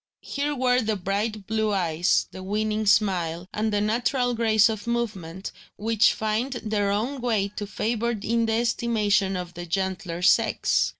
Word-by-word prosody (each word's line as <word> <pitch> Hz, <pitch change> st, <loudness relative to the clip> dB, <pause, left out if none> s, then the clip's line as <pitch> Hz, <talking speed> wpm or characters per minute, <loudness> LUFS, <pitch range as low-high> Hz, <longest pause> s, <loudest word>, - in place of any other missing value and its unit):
Here 290 Hz, +1 st, -2 dB
were 250 Hz, -1 st, +2 dB
the 220 Hz, -1 st, 0 dB
bright 205 Hz, +2 st, -2 dB
blue 220 Hz, 0 st, 0 dB
eyes, 175 Hz, -2 st, +1 dB
the 185 Hz, -, -9 dB
winning 215 Hz, +2 st, -1 dB
smile, 180 Hz, -4 st, +2 dB
and 215 Hz, +1 st, -1 dB
the 205 Hz, 0 st, +1 dB
natural 245 Hz, +3 st, +1 dB
grace 220 Hz, -2 st, +4 dB
of 220 Hz, 0 st, -4 dB
movement, 200 Hz, -7 st, -3 dB, 0.3 s
which 220 Hz, 0 st, +3 dB
find 220 Hz, +5 st, -1 dB
their 215 Hz, -4 st, -1 dB
own 240 Hz, +7 st, -1 dB
way 220 Hz, -5 st, 0 dB
to 205 Hz, 0 st, -6 dB
favour 235 Hz, +3 st, -1 dB
in 230 Hz, +2 st, 0 dB
the 225 Hz, -, +1 dB
estimation 215 Hz, -4 st, +1 dB
of 175 Hz, -1 st, -6 dB
the 175 Hz, 0 st, -7 dB
gentler 185 Hz, -1 st, -2 dB
sex. -, -, +3 dB
215 Hz, 160 wpm, -25 LUFS, 195-230 Hz, 0.3 s, grace